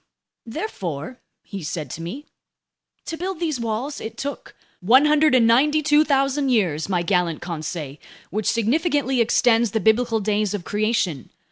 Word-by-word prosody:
"Therefore," 225 - -5 0.2
he 200 -2 -7
said 150 -3 -5
to 165 - -6
me, 240 - -7 0.8
"to 330 - -4
build 370 0 -4
these 315 -6 -2
walls, 235 +5 -3
it 220 - -7
took... 285 +1 -6
?" - - -37
"192,000 280 +3 +3
years, 185 -10 +1
my 180 -3 0
gallant 175 -3 0
Conseil, 155 -4 -5 0.3
which 210 +2 -1
significantly 265 - +1
extends 235 0 +3
the 220 - +1
biblical 225 +1 +2
Days 210 0 0
of 195 - -5
Creation. 210 - -1
230 Hz, 130 wpm, -22 LUFS, 185-280 Hz, 0.8 s, 192,000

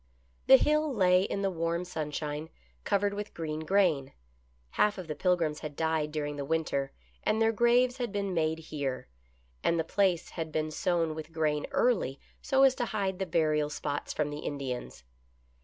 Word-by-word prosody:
The 265 - +10
Hill 305 +2 +2
lay 185 -6 +4
in 200 +1 -2
the 195 - +1
warm 170 +1 -1
sunshine, 150 -2 -4 0.3
covered 200 0 +1
with 205 +1 -6
green 155 -2 -3
grain. 160 -5 +2 0.6
Half 210 0 +2
of 185 - -6
the 155 - -2
Pilgrims 165 -2 +1
had 150 -2 -7
died 160 -1 0
during 145 -1 -3
the 140 - -3
winter, 140 -2 -1 0.3
and 220 - +1
their 225 0 +4
graves 245 +3 +3
had 245 -4 -3
been 200 -2 -2
made 160 -1 +1 0.2
here, 135 - -3 0.5
and 170 - +2
the - - +2
place 190 -1 +1
had 160 -2 -5
been 155 0 -1
sown 165 0 0
with 155 +1 -7
grain 155 -2 0
early 185 - +1 0.2
so 270 -1 +3
as 270 -1 +6
to 245 - 0
hide 195 -4 -2
the 190 - -2
burial 155 -3 +1
spots 145 -1 -3
from 150 -1 -1
the 145 - -5
Indians. 135 - -5
165 Hz, 175 wpm, -30 LUFS, 150-200 Hz, 0.6 s, The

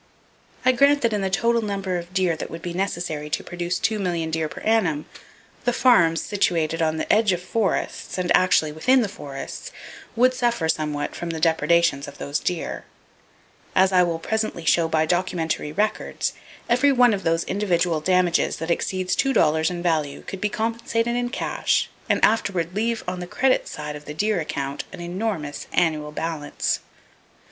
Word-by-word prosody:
I 255 - +7
grant 280 +2 +4
that 230 -2 +2
in 205 - 0
the 190 - 0
total 230 +4 +2
number 195 -4 -2
of 170 +1 -10
deer 185 -3 +1
that 160 - -6
would 165 +1 -8
be 175 - -4
necessary 175 -5 -3
to - - -2
produce 175 +1 -3
two 215 +2 0
million 170 -4 -1
deer 160 -1 -1
per - - -9
annum, 185 -10 +1 0.6
the 245 - +2
farms 175 -11 +4
situated 165 -5 0
on 160 -1 +1
the - - +1
edges 215 -3 +4
of 180 - -14
forests, 220 -4 -1
and 180 -1 +2
actually 180 -4 +3
within 255 +13 +3
the - - -1
forests, 140 -8 -7 0.4
would 255 +2 +4
suffer 235 -9 0
somewhat 150 -2 -1
from 175 - -5
the 165 -1 -3
depredations 165 -2 +2
of 140 - -10
those 145 +1 -2
deer. 175 -2 -3 0.9
As 190 +1 +5
I 185 -1 +5
will 170 -2 +1
presently 215 -1 -2
show 165 +2 +3
by 160 -1 +2
documentary 165 -3 -1
records, 210 +7 -1 0.3
every 255 +4 +4
one 245 -3 +5
of 195 - -2
those 165 -1 +1
individual 175 -5 0
damages 180 0 +2
that 165 +2 -3
exceeds 185 +1 -1
two 270 0 +1
dollars 160 -3 +3
in 175 -1 -5
value 155 -5 0
could 195 - -7
be 210 - +1
compensated 230 +2 -1
in 245 0 -1
cash, 255 - 0 0.2
and - - +4
afterward 185 -6 0
leave 225 +3 -1
on 180 0 -3
the 180 - -6
credit 260 +7 +1
side 150 0 -6
of 150 0 -10
the 150 - -7
deer 210 +2 +1
account 140 -2 -3
an - - -9
enormous 175 -4 -4
annual 155 -3 +1
balance. 155 -1 -2
175 Hz, 180 wpm, -23 LUFS, 160-215 Hz, 0.9 s, I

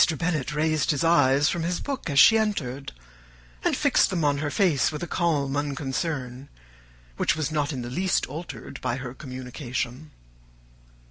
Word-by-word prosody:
Bennet 155 -5 -1
raised 155 -1 +1
his 150 -2 +1
eyes 145 -3 +4
from 170 - 0
his 175 +2 -1
book 275 -10 -4
as 140 - -1
she 220 - +8
entered, 150 - -1 0.7
and - - +1
fixed - - +3
them 170 -5 0
on 145 -1 +2
her 145 0 -1
face 160 -5 +2
with 155 +2 -5
a - - -3
calm 145 -7 0
unconcern, 140 -2 -3 0.7
which - - +2
was 155 -1 -2
not 150 -1 0
in 130 -4 -4
the 120 - -5
least 185 +6 +1
altered 160 +6 -8
by 125 -2 -1
her 125 -1 -6
communication. 130 +1 -5
145 Hz, 160 wpm, -25 LUFS, 130-165 Hz, 0.7 s, she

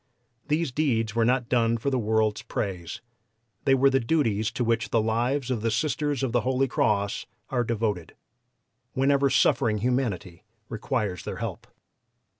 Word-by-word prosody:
These 155 -1 0
deeds 120 -6 0
were 115 0 +2
not 125 0 +1
done 115 -2 +2
for 125 +5 -2
the 130 - +1
world's 110 -1 +1
praise; 90 -4 -4 0.6
they 135 - +5
were 135 +1 +4
the 135 - +3
duties 115 -6 +1
to 125 - -1
which 115 +2 0
the 115 - +2
lives 120 +5 0
of 120 -4 -1
the 115 - +1
Sisters 145 +3 -1
of 130 - 0
the 120 0 +2
Holy 130 +3 +1
Cross 100 -4 0 0.2
are 125 -2 +1
devoted, 110 -7 -2 0.8
whenever 140 +1 +3
suffering 120 -3 +3
humanity 105 -7 -2 0.3
requires 105 - -2
their - - -5
help. - - -5
115 Hz, 155 wpm, -26 LUFS, 110-135 Hz, 0.8 s, they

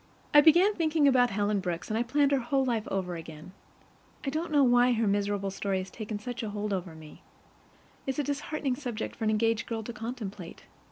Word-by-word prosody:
I 295 - +9
began 345 +7 +6
thinking 315 -4 +2
about 250 -2 +4
Helen 205 0 0
Brooks, 175 -3 -4
and 215 - -1
I 225 - +1
planned 280 +4 +2
her 275 - +3
whole 265 +2 0
life 230 -4 -1
over 185 -2 -2
again. 160 0 -9 0.7
I 275 - -1
don't 315 +2 -3
know 290 -2 +5
why 245 0 +5
her 230 -1 +1
miserable 200 -1 0
story 195 0 -2
has 185 0 -5
taken 215 -1 -5
such 235 +2 -6
a 220 - -4
hold 205 0 -3
over 180 -3 -4
me. 155 -1 -13 0.9
It's 265 - -2
a 295 - +1
disheartening 285 -1 -2
subject 245 -6 -5
for 225 - -4
an - - +2
engaged 225 +1 +1
girl 225 -1 -3
to 240 - -6
contemplate. 215 -7 -7
225 Hz, 210 wpm, -29 LUFS, 200-270 Hz, 0.9 s, I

